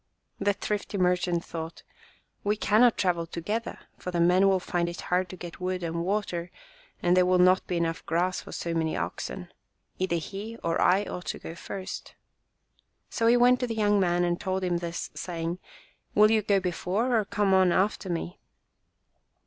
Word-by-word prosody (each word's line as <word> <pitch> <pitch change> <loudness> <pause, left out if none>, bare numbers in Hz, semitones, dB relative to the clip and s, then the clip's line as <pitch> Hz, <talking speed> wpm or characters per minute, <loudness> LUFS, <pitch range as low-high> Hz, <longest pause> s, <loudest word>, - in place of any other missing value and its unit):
The 205 0 +2
thrifty 205 0 -3
merchant 180 -2 +1
thought, 165 0 -7 0.6
"We 205 +1 +1
cannot 220 +3 +4
travel 175 -3 0
together, 210 +8 -3 0.2
for - - -5
the 175 -1 -1
men 180 +3 +5
will 190 -1 +3
find 175 -1 -1
it 170 - -7
hard 180 0 0
to 185 - -7
get 175 -1 -9
wood 185 0 -2
and 170 0 -2
water, 180 -3 -2 0.5
and 175 +1 +4
there 185 - +5
will 185 0 +4
not 185 +1 +4
be 180 - -1
enough 165 +1 -1
grass 180 +2 0
for - - -11
so 170 - -3
many 160 -1 0
oxen. - - -5 0.5
Either 185 -2 0
he 200 +7 -5
or 165 0 0
I 190 +3 +4
ought 180 -2 -6
to - - -3
go - - -8
first." 185 +2 -7 1.0
So 230 - +1
he 240 +1 +6
went 250 +1 +5
to 250 - -1
the 225 - -3
young 205 -1 +3
man 175 -2 +2
and 175 0 0
told 190 -1 -1
him 175 -1 +1
this, 170 -1 -5
say 170 -2 -5
ing, 170 +2 -2 0.6
"Will 215 +1 +6
you 220 -1 +4
go 200 -1 +2
before 190 +7 -1
or - - 0
come 205 -1 +1
on 185 -1 +5
after 190 +1 +1
me 170 +1 -4
185 Hz, 190 wpm, -27 LUFS, 175-205 Hz, 1.0 s, he